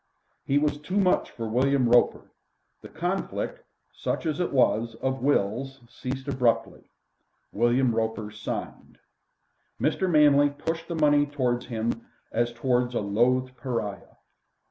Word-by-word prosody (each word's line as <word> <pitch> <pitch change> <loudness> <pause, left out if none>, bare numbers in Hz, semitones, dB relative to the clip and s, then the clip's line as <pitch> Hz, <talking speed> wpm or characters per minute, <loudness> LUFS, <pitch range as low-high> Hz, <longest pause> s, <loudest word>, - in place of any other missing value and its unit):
He 140 - +1
was 145 0 +1
too 180 +7 -3
much 185 -2 +2
for 115 -1 -6
William 130 +3 +2
Roper. 120 0 +3 0.5
The - - -10
conflict, - - -3 0.3
such - - -3
as 155 -1 -1
it 180 - 0
was, 115 -3 +2
of 130 +2 -2
wills 135 +1 0
ceased 130 +3 -6
abruptly. 125 -4 0 0.7
William 120 +2 +2
Roper 110 -1 -2
signed. 105 0 -6 0.8
Mr. 190 - +1
Manley 145 -3 +5
pushed 165 +3 -4
the 170 - -4
money 145 -2 +4
towards 125 -4 -1
him 115 -1 -3 0.2
as 120 +1 0
towards 125 0 0
a - - +2
loathed 125 +5 +1
pariah. 115 -6 -4
130 Hz, 130 wpm, -26 LUFS, 115-145 Hz, 0.8 s, Manley